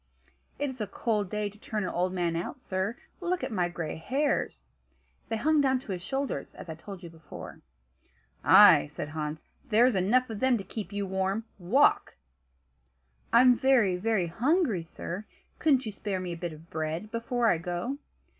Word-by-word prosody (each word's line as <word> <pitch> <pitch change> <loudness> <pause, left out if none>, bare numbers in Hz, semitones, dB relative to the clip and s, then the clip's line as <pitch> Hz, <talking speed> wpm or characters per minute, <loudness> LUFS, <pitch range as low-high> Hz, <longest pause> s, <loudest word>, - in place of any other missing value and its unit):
"It 290 - -1
is 260 -3 -6
a 210 - -2
cold 210 -1 -1
day 210 +1 -1
to 205 +1 -11
turn 215 -2 -3
an 185 - -2
old 180 +1 0
man 175 -2 -1
out 170 +10 -3
in, - - -29
sir; 195 0 -2 0.2
look 360 0 -1
at - - -3
my 180 -4 0
gray 165 -3 -4
hairs." 275 - -1 0.6
They 225 - -1
hung 305 +6 +3
down 265 -2 +3
to 250 -5 -8
his 180 -2 -3
shoulders, 270 +8 -3
as - - -10
I - - -3
told 190 +3 -10
you 170 - -8
before. 160 -2 -11 0.8
"Ay!" 75 - +8
said 145 - -6
Hans, 155 0 -4 0.3
"there 230 +2 +5
are 250 -4 +3
enough 225 +8 +3
of 215 - -5
them 260 0 +3
to 200 - -6
keep 200 0 -6
you 200 0 -2
warm. 190 +3 -1 0.2
Walk!" 230 +12 +3 1.2
"I'm 250 +1 +7
very, 240 -8 +3
very 200 0 +1
hungry, 245 - +1
sir; 175 +4 -6 0.3
couldn't 270 -5 +3
you 215 - -3
spare 200 -1 -3
me 180 -1 -4
a - - -3
bit 170 -1 -5
of 155 +2 -15
bread 160 +6 -3
before 235 +1 -1
I 165 - +2
go?" 175 +11 -3
205 Hz, 190 wpm, -29 LUFS, 175-250 Hz, 1.2 s, Ay